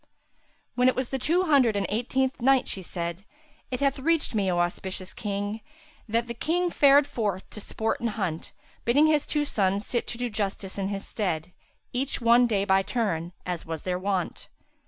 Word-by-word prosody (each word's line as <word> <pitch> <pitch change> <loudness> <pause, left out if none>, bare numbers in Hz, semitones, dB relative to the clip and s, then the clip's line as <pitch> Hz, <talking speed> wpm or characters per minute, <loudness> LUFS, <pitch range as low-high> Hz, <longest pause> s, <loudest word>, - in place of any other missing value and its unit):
When 250 0 +3
it 255 - +3
was 260 -2 -2
the 270 - -2
Two 340 +8 +2
Hundred 275 - +4
and 200 -1 0
Eighteenth 260 +4 -1
Night, 265 +1 +4
She 190 - -3
said, 170 0 -4 0.5
It 250 0 -3
hath 275 0 +2
reached 325 +1 +2
me, 200 -3 +1
O 175 - +1
auspicious 185 +2 -2
King, 205 +1 -3 0.5
that 230 +2 +1
the 235 - -5
King 345 +8 0
fared 285 -1 +6
forth 205 -8 -2
to - - -8
sport 220 +2 -2
and 235 - -1
hunt, 190 -7 -3 0.3
bidding 280 +6 +4
his 305 -2 +2
two 295 -1 +1
sons 200 -5 0
sit 240 - -1
to 235 - -4
do 245 0 -1
justice 200 -3 -3
in 195 - -1
his 195 0 -4
stead, 180 -5 -2 0.4
each 260 +2 -1
one 240 0 +5
day 200 -3 +1
by 190 -1 +4
turn, 190 -7 -1
as 175 -3 -4
was 160 -1 -5
their 180 -1 -1
wont. 190 -2 -2
220 Hz, 190 wpm, -27 LUFS, 190-260 Hz, 0.5 s, fared